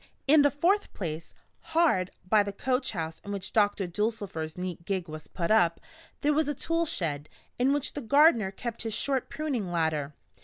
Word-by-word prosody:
In 300 +2 +7
the 285 - +5
fourth 350 +9 +1
place, 165 -3 -5 0.4
hard 190 - +3 0.2
by 215 +2 +5
the 200 0 -2
coach 250 +5 -1
house 160 -3 -4
in 205 - -6
which 195 -2 -5
Doctor 205 -2 +2
Dulcifer's 185 -5 -3
neat 180 -2 -5
gig 185 -1 -2
was 155 0 -8
put 170 +3 -2
up, 175 -6 +4 0.4
there 295 +1 +3
was 305 0 +2
a 295 - -1
tool 330 +4 0
shed, 150 - -2 0.3
in 255 +2 +3
which 290 0 -1
the 290 - -4
gardener 255 -4 +5
kept 230 +4 -6
his 225 -2 -3
short 265 +2 -1
pruning 260 - -3
ladder. 155 -4 -1
205 Hz, 185 wpm, -28 LUFS, 170-280 Hz, 0.4 s, In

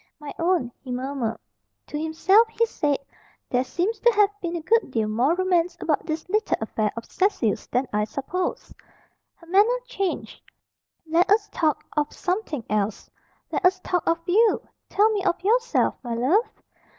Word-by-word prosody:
"My 295 -1 -7
own," 335 -8 +1
he 260 - -13
murmured. 250 -2 -2 0.5
To 300 - -5
himself 380 +8 +4
he 460 +1 +1
said, 295 -10 0 0.5
"There 250 0 +2
seems 360 - -2
to 475 - +5
have 415 -1 +4
been 345 -1 -3
a 335 - -3
good 460 +1 +2
deal 225 -4 0
more 245 +9 +2
romance 360 -2 +1
about 310 -1 -1
this 315 0 -3
little 425 +3 +1
affair 215 -1 -1
of 230 - -5
Cecil's 370 - 0
than 250 +2 0
I 210 0 +1
supposed." 310 +9 -4 0.6
Her 340 - -19
manner 410 +8 +3
changed. 395 -7 -3 0.6
"Let 335 +3 +2
us 415 +1 +3
talk 310 -4 0
of 300 -1 0
something 360 - -2
else! 210 0 -2 0.4
Let - - -1
us 370 +1 +4
talk 360 -2 -1
of 330 - +3
you. 425 +5 +3 0.2
Tell 425 +2 +3
me 410 -3 -1
of 370 - +1
yourself, 475 +4 +2
my 240 -3 -4
love!" 310 - +2
340 Hz, 165 wpm, -24 LUFS, 265-400 Hz, 0.6 s, to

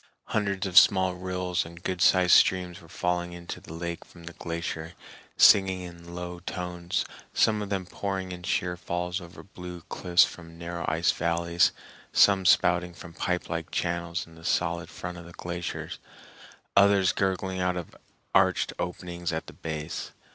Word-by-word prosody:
Hundreds 100 -1 0
of 95 -2 +9
small 95 -2 +3
rills 90 0 -2
and 85 +1 -12
good 90 -2 -2
sized 90 0 +5
streams 90 -1 +4
were 85 - -15
falling 90 0 -1
into 85 0 -7
the - - -12
lake 85 +1 -5
from 85 - -16
the 85 +1 -8
glacier, 85 -1 -5 0.4
singing 95 -2 +6
in 85 -1 -10
low 90 0 -5
tones, 90 0 -3 0.3
some 110 -1 +3
of 100 - -4
them 95 -2 -1
pouring 95 0 -4
in 90 -1 -7
sheer 90 0 -1
falls 90 +1 -3
over 85 +1 -11
blue 90 -2 -9
cliffs 90 -1 +4
from 85 -1 -6
narrow 85 0 -5
ice 80 +2 +2
valleys, 85 +1 +2 0.4
some 95 -2 +5
spouting 90 0 +4
from 85 -1 -11
pipelike 85 -2 -2
channels 85 0 -2
in 85 - -17
the 80 0 -15
solid 85 0 0
front 90 +1 -7
of 85 - -11
the 85 - -12
glacier, 85 0 -5 0.8
others 100 -2 +5
gurgling 95 -1 -1
out 90 0 0
of 85 - -7 0.4
arched - - +3
openings 90 -1 -4
at 80 0 -3
the - - -11
base. 80 0 -5
90 Hz, 160 wpm, -27 LUFS, 85-90 Hz, 0.8 s, of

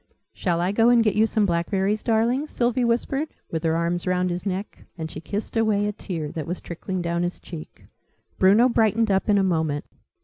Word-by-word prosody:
"Shall 170 -3 -1
I 180 +2 +1
go 225 +3 +4
and 240 -1 +5
get 215 -3 +2
you 220 +2 +3
some 215 -1 +1
blackberries, 190 +4 0
darling?" 235 +5 +1
Sylvie 245 -2 0
whispered, 245 +5 0 0.2
with 160 -1 -2
her 160 -1 +2
arms 170 +2 -1
round 180 0 +1
his 180 +3 -4
neck; 195 +2 -5
and 160 -1 -5
she 155 - -7
kissed 205 +7 -5
away 215 -2 +2
a 210 - 0
tear 165 -7 -5
that 155 -3 -5
was 175 +2 -3
trickling 180 +1 -5
down 170 0 -1
his 175 0 -2
cheek. 165 -3 -10 0.5
Bruno 205 +6 +6
brightened 225 -2 +2
up 190 +2 +1
in 205 - +5
a 195 - +3
moment. 160 -5 0
195 Hz, 205 wpm, -24 LUFS, 170-225 Hz, 0.5 s, Bruno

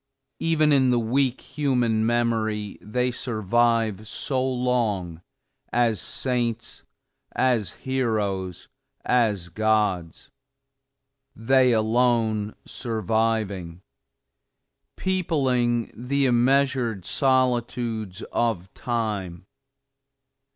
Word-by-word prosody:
Even 155 -2 +3
in 130 -2 +4
the 125 - +3
weak 125 +3 +1
human 125 -6 0
memory 110 -3 0
they 125 +4 -1
survive 115 -2 0
so 130 +3 -2
long, 120 -10 -1 0.5
as 120 -3 +2
saints, 120 -3 -2 0.5
as 120 -6 +1
heroes, 105 -9 -1 0.4
as 105 -8 +1
gods; 105 -4 0 1.0
they 130 +2 +3
alone 110 -2 +1
surviving; 110 -5 -2 1.1
peopling 130 -11 0
the 135 +4 0
immeasured 125 -4 +2
solitudes 120 -3 0
of 105 -6 -1
Time! 105 -7 -3
115 Hz, 75 wpm, -24 LUFS, 105-125 Hz, 1.1 s, in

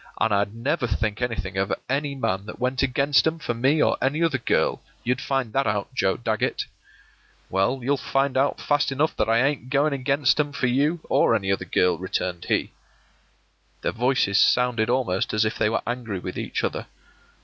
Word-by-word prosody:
An' 110 - +2
I'd 100 +1 +1
never 130 +3 -1
think 105 +1 -2
anything 105 -6 -3
of 95 +1 0 0.2
any 140 +1 -1
man 100 -6 -2
that - - -8
went 125 +1 0
against 140 +3 +3
'em 160 +1 0
for 135 -7 -3
me 135 +6 +2
or - - +1
any 145 +5 +1
other 155 -6 +1
girl; - - +1 0.2
you'd 125 +2 0
find 135 -5 -2
that 135 0 +1
out, 105 +4 -2
Joe 95 -6 +1
Dagget.” 110 -3 -1 0.9
“Well, 95 +8 +1
you'll 140 +3 +1
find 135 0 0
out 135 +2 +1
fast 145 -1 +1
enough 145 +4 0
that 110 - +1
I 115 +2 +4
ain't 140 -3 -3
going 140 +2 +2
against 135 +1 +1
'em 145 -1 0
for 140 - -1
you 145 +7 +1
or - - +3
any 95 -1 0
other 95 -2 -1
girl,” 90 0 +1
returned 90 -2 -3
he. - - 0 1.1
Their - - 0
voices 120 -4 +2
sounded 125 -3 +3
almost 120 -7 0
as 110 +1 +3
if 110 - -1
they 105 - +3
were 115 - -1
angry 120 -4 -3
with 90 0 -6
each - - -3
other. - - -2
125 Hz, 195 wpm, -24 LUFS, 105-140 Hz, 1.1 s, I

